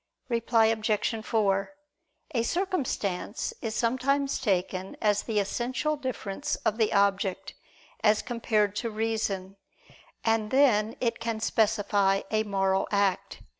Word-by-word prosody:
Reply 230 -1 +3
Obj. 220 0 0
4: 200 -1 +1 0.6
A 235 - +2
circumstance 285 - -2
is 225 -3 -3
sometimes 270 +4 +1
taken 190 -2 -1
as 210 -1 +2
the 220 -2 -3
essential 250 +9 -1
difference 255 -8 -3
of 220 - +1
the 220 - +3
object, 200 -1 +1 0.5
as 210 -1 +4
compared 220 -4 0
to 230 - -2
reason; 215 -3 -2 0.7
and 225 -1 +1
then 230 -5 +3
it 230 -2 0
can 230 -1 -2
specify 205 -3 +2
a 215 0 +2
moral 195 -2 0
act. 200 -2 0
220 Hz, 120 wpm, -28 LUFS, 200-235 Hz, 0.7 s, as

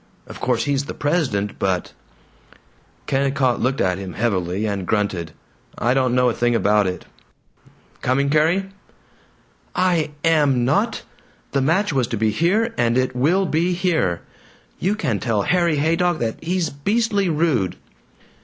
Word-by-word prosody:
Of - - -10
course 125 -2 0
he's 140 -1 0
the - - -7
president, 135 - -1
but 95 -2 -1 0.5
" - - -31
Kennicott 135 -2 +1
looked 130 +2 0
at 90 0 +1
him 95 -2 -6
heavily, 95 -3 -1
and 100 -4 -3
grunted, 95 -6 -1 0.5
"I 120 +2 +1
don't 130 -2 +1
know 125 0 +3
a 120 - +2
thing 120 +1 +1
about 105 -2 +3
it.... 90 0 -4 1.0
Coming, 140 +2 +1
Carrie?" 165 +6 +2 1.1
"I 175 -4 +2 0.2
am 145 -7 +3
not! 205 - 0 0.5
The 140 - +1
match 165 +6 +1
was 130 -4 +1
to 115 - -3
be 110 +1 +1
here, 205 - +1
and 120 0 +2
it 130 -1 0
will 170 +10 +2
be 170 +2 +1
here! 170 - 0 0.6
You 195 +4 0
can 120 - -1
tell 105 0 0
Harry 170 - +2
Haydock 165 +3 +1
that 115 +1 -3
he's 175 0 -1
beastly 200 +5 0
rude!" 150 - +1
135 Hz, 150 wpm, -21 LUFS, 110-170 Hz, 1.1 s, know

